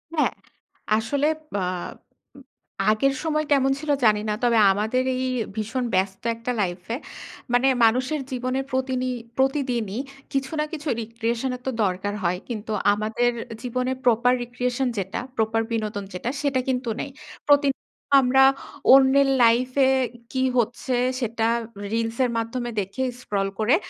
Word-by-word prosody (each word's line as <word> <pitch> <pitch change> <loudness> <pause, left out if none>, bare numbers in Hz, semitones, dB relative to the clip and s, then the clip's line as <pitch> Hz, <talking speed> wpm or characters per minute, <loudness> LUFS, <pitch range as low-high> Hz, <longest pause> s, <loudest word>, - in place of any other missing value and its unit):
হ্যাঁ, 305 - +2 0.6
আসলে 280 +7 0 0.3
বা 200 - -1 0.8
উ - - -11 0.5
আগের 270 +6 +3
সময় 305 -1 0
কেমন 270 -1 +4
ছিল 300 -1 -2
জানি 210 -1 +4
না। - - +1
তবে 235 -2 +4
আমাদের 220 +6 0
এই 260 0 -1 0.3
ভীষণ 220 +4 -2
ব্যস্ত 190 +2 0
একটা 230 +2 -4
লাইফে 185 +4 -3 0.6
মানে 250 +2 +4 0.2
মানুষের 255 +6 +1
জীবনের 255 +1 -1
প্রতিনি 260 -1 -1 0.3
প্রতিদিনই 255 -5 0 0.3
কিছু 270 +1 -1
না - - +2
কিছু 300 0 -5
recreation 230 +3 -2
এর 250 - -11
তো - - +1
দরকার 190 +2 -1
হয়। 180 +1 0
কিন্তু 220 -1 -5 0.2
আমাদের 220 +3 0 0.3
জীবনের 255 +1 -1
proper 245 +1 +4
recreation 250 +2 -2
যেটা 190 0 -2 0.2
proper 225 0 +1
বিনোদন 215 -3 -2
যেটা, 205 +7 -3
সেটা 275 -3 +1
কিন্তু 250 -2 -1
নেই। 285 - -3 0.4
প্রতি 285 0 +6 0.5
আমরা 265 +1 +5 0.5
অন্যের 270 +1 +6 0.2
লাইফে 255 +3 +4 0.4
কী 260 0 0
হচ্ছে? 240 +2 0 0.2
সেটা 230 -2 -1 0.5
রিলসের 230 +2 0
মাধ্যমে 240 +2 -2
দেখে 195 +7 -3 0.2
স্ক্রল 195 -3 -1
করে 235 +8 +4
245 Hz, 135 wpm, -24 LUFS, 220-265 Hz, 0.8 s, প্রতি